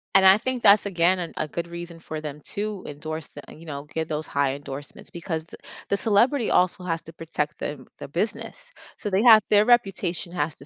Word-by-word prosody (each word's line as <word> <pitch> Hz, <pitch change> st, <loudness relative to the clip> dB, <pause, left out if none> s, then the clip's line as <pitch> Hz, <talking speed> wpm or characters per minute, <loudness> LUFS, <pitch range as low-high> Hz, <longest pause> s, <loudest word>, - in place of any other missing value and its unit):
and 190 Hz, 0 st, +7 dB
I 190 Hz, +2 st, +8 dB
think 255 Hz, +1 st, -3 dB
that's 200 Hz, +1 st, +6 dB
again 180 Hz, 0 st, +2 dB
an 170 Hz, -2 st, -5 dB
a 155 Hz, -, -1 dB
good 170 Hz, +2 st, -4 dB
reason 170 Hz, -1 st, -8 dB
for 155 Hz, -1 st, -6 dB
them 150 Hz, -1 st, -7 dB
to 205 Hz, -1 st, -3 dB
endorse 155 Hz, +2 st, -6 dB
the 145 Hz, -, -10 dB
you 165 Hz, -, -14 dB
know, 140 Hz, -3 st, -6 dB
get 160 Hz, -1 st, -2 dB
those 155 Hz, 0 st, -2 dB
high 140 Hz, -1 st, 0 dB
endorsements 140 Hz, 0 st, -9 dB
because 160 Hz, -2 st, -4 dB
th 170 Hz, -, -14 dB, 0.3 s
the 200 Hz, -, +2 dB
celebrity 230 Hz, +4 st, +2 dB
also 180 Hz, 0 st, +2 dB
has 165 Hz, -2 st, -2 dB
to 165 Hz, -, -12 dB
protect 150 Hz, -2 st, -4 dB
the 135 Hz, -3 st, -5 dB
the -, -, -7 dB
business, 175 Hz, +10 st, -4 dB, 0.3 s
so 210 Hz, -, -4 dB
they 190 Hz, +1 st, +2 dB
have 225 Hz, -3 st, +9 dB
their 210 Hz, 0 st, +5 dB
reputation 195 Hz, -7 st, +1 dB
has 150 Hz, -3 st, -1 dB
to 140 Hz, -, -14 dB
170 Hz, 215 wpm, -25 LUFS, 155-200 Hz, 0.3 s, have